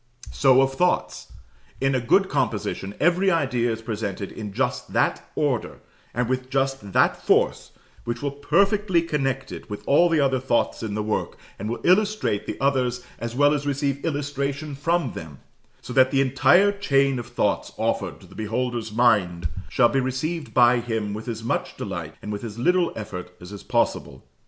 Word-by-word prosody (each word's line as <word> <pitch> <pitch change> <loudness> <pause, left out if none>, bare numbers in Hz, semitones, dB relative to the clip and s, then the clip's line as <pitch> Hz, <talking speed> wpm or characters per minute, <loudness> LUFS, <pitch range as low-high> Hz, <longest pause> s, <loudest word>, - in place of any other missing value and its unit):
So 135 -1 +5
of 135 0 -1
thoughts: 180 +6 0 0.5
in 135 0 +1
a 130 - +1
good 190 - +3
composition, 105 - -2
every 180 +3 +3
idea 130 -8 +1
is 115 0 -5
presented 105 -3 -4
in 105 -2 -7
just 125 +5 -2
that - - 0
order, - - -1 0.3
and 120 0 -1
with 130 0 -2
just 135 -7 -1
that - - +3
force, - - +2 0.3
which 120 +2 -4
will 140 - -1
perfectly 195 +5 +2
connect 135 -4 -2
it - - -9
with 105 - -6
all 170 +5 +4
the 165 -2 +2
other 135 -2 +2
thoughts 125 -2 0
in 105 -2 -4
the 105 - -1
work, 105 0 -2 0.2
and 105 +2 -4
will 120 - -4
illustrate 205 - +2
the - - -5
others 125 -3 0
as 115 0 -5
well 145 +2 +4
as 145 -1 -2
receive 140 0 -1
illustration 145 -1 -2
from 145 -1 0
them; 80 -4 -8 0.5
so 125 - -7
that 130 0 +5
the 135 - +1
entire 175 +9 +4
chain 140 -9 +1
of 120 - -7
thoughts - - -1
offered - - -2
to - - -14
the - - -16
beholder's 115 +1 -3
mind 95 -8 +2 0.2
shall 120 -2 +4
be 135 - +1
received 145 +5 -3
by 120 0 +5
him 110 -3 -3
with 110 +3 -7
as 115 -1 -4
much 115 - -2
delight - - -5
and 105 - -5
with 105 +1 -5
as 110 -2 -7
little 180 +7 +2
effort 90 -4 -7
as 90 +2 -11
is 100 - -8
possible. - - -1
130 Hz, 180 wpm, -24 LUFS, 115-145 Hz, 0.5 s, So